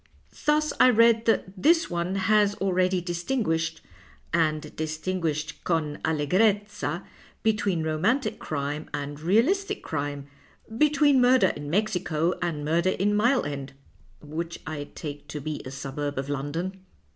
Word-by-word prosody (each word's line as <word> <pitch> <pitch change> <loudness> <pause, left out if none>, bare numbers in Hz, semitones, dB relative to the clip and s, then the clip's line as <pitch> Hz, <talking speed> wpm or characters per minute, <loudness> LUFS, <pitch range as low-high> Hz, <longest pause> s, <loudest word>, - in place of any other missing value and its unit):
Thus 300 0 +2
I 255 - +8
read 230 -1 +5
that 225 - +3 0.2
this 330 +2 +4
one 175 +2 -2
has 205 +1 +3
already 185 -2 +1
dislingiiished, 175 -3 -1 0.5
and 155 -2 0
distinguished 155 -1 -3
con 155 -3 -1
alle 155 -2 0
grezza, 205 +4 +1 0.4
between 205 -6 +1
romantic 160 - 0
crime 145 +1 -4
and 145 0 -5
realistic 235 - +1
crime, 145 -2 -3 0.5
between 290 0 +4
murder 255 +1 +5
in 145 0 -6
Mexico 175 -3 0
and 160 -4 -2
murder 170 +4 +2
in 205 +2 +1
Mile 240 +5 +3
End 140 -2 -5 0.5
(which 165 +3 -5
I 150 -2 -4
take 145 -2 -7
to 150 - -5
be 150 +1 -4
a - - -5
suburb 140 +2 -4
of 135 +1 -3
London). 165 +7 -3
170 Hz, 135 wpm, -26 LUFS, 150-210 Hz, 0.5 s, I